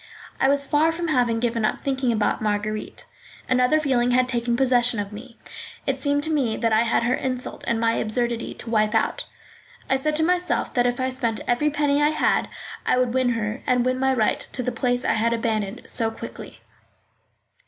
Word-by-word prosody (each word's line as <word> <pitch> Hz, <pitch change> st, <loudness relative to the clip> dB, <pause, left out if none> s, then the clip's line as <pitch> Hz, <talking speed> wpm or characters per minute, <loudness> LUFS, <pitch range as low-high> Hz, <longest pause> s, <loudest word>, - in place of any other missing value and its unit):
I 270 Hz, -, +3 dB
was 280 Hz, 0 st, +2 dB
far 300 Hz, +3 st, +3 dB
from 340 Hz, 0 st, -3 dB
having 245 Hz, -5 st, +2 dB
given 230 Hz, -1 st, -1 dB
up 215 Hz, -, 0 dB
thinking 265 Hz, -2 st, 0 dB
about 215 Hz, -2 st, 0 dB
Marguerite. 215 Hz, 0 st, -3 dB, 0.4 s
Another 255 Hz, +4 st, +3 dB
feeling 255 Hz, -5 st, +1 dB
had 250 Hz, 0 st, +3 dB
taken 240 Hz, -1 st, -1 dB
possession 245 Hz, -3 st, +3 dB
of 205 Hz, 0 st, -4 dB
me. 230 Hz, +3 st, -11 dB, 0.5 s
It 270 Hz, -1 st, -1 dB
seemed 285 Hz, +1 st, +1 dB
to 320 Hz, -, -2 dB
me 260 Hz, -8 st, 0 dB
that 230 Hz, -2 st, +1 dB
I 220 Hz, -, +4 dB
had 235 Hz, 0 st, +1 dB
her 240 Hz, +1 st, +1 dB
insult 255 Hz, -1 st, -3 dB
and 230 Hz, -1 st, +1 dB
my 230 Hz, 0 st, +2 dB
absurdity 235 Hz, +2 st, -1 dB
to 235 Hz, -, -8 dB
wipe 215 Hz, -2 st, +2 dB
out; -, -, 0 dB, 0.7 s
I 265 Hz, -, +4 dB
said 305 Hz, +3 st, -1 dB
to 320 Hz, -, +1 dB
myself 360 Hz, +1 st, +1 dB
that 245 Hz, -1 st, +2 dB
if 245 Hz, +1 st, -2 dB
I 260 Hz, 0 st, 0 dB
spent 235 Hz, -4 st, -2 dB
every 245 Hz, +5 st, +1 dB
penny 290 Hz, -1 st, +1 dB
I 295 Hz, -, +4 dB
had, 310 Hz, -, +1 dB, 0.3 s
I -, -, +2 dB
would 250 Hz, -2 st, +1 dB
win 255 Hz, -2 st, +2 dB
her 220 Hz, +1 st, -3 dB
and 250 Hz, -1 st, +2 dB
win 255 Hz, 0 st, 0 dB
my 265 Hz, 0 st, +2 dB
right 225 Hz, -5 st, +1 dB
to 250 Hz, -, -3 dB
the 250 Hz, -, -1 dB
place 245 Hz, +1 st, -1 dB
I -, -, +2 dB
had 230 Hz, +2 st, +1 dB
abandoned 220 Hz, -3 st, -2 dB
so 225 Hz, -1 st, -1 dB
quickly. 225 Hz, -, -10 dB
245 Hz, 205 wpm, -23 LUFS, 230-270 Hz, 0.7 s, I